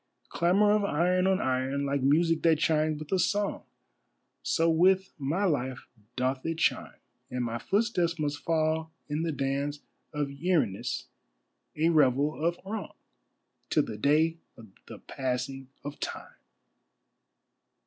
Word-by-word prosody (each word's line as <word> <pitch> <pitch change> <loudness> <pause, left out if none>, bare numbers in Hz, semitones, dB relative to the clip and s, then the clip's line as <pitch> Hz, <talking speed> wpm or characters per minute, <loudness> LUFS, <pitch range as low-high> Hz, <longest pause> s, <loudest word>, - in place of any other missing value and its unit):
Clamour 195 +5 +3
of 210 0 +3
iron 180 +1 +2
on 190 -1 +2
iron; 130 +2 0
like 140 0 0
music 160 +4 +3
that 165 -2 +4
chimes 155 -1 +1
with 155 0 -9
a 190 - +2
song, 205 +2 0 0.8
So 165 - +1
with 185 +4 +3
my 150 +8 -1
life 130 -7 -1 0.3
doth 130 +1 -1
it 165 0 -2
chime, - - 0 0.3
And 125 -1 -2
my 115 0 -3
footsteps 185 - 0
must 145 -2 -2
fall 160 0 0 0.2
in 150 +2 -1
the 165 0 -1
dance 140 +1 -2 0.3
of 145 -1 -2
Erinnys, 140 - -1 0.7
a 160 +2 +2
revel 150 0 +2
of 170 +1 +1
wrong, 210 +1 -5 0.7
Till - - +3
the 110 - -6
day 155 +6 +3 0.2
of 110 -2 -13 0.2
the - - -9
passing 130 0 -4 0.2
of 145 +1 -7
Time! - - -6
155 Hz, 140 wpm, -29 LUFS, 140-170 Hz, 0.8 s, that